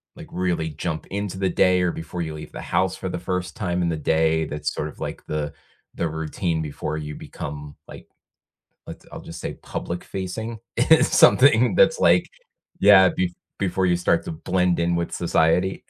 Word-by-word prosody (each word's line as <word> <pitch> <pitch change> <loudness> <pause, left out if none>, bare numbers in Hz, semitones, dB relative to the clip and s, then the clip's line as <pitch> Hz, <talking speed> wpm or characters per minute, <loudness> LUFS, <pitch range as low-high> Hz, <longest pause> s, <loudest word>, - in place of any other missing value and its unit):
like, - - -10
really 90 -3 -1
jump 80 +1 -4
into 100 -1 -3
the 95 - 0
day 90 0 +3
or 90 - +1
before 85 +2 -5
you 80 - -5
leave 75 0 -9
the - - -8
house 95 0 0
for 95 - -5
the 90 - -4
first 90 0 -3
time 90 -6 -1
in 85 - +1
the 80 - -1
day 80 +1 +1
that's 75 +1 -3
sort 75 - -3
of - - -12
like - - -5
the 75 -1 -3 0.4
the 85 - -1
routine 80 +2 -2
before 75 +1 -4
you 75 -1 -5
become, 75 0 -8
like, - - -12 0.8
let's - - -10
I'll - - -7
just 85 +1 -9
say - - -4
public 85 +1 -6
facing. 110 +5 -5 0.2
It's 160 +7 +4
something - - +6
that's - - +4
like - - +4 0.5
yeah, 95 -2 +7
bef 90 -1 -1 0.3
before 95 0 0
you 90 -1 +3
start 85 - +1
to - - -5
blend 90 +2 0
in 85 +1 +1
with 85 0 -2
society. 85 +2 +1
85 Hz, 190 wpm, -23 LUFS, 80-95 Hz, 0.8 s, yeah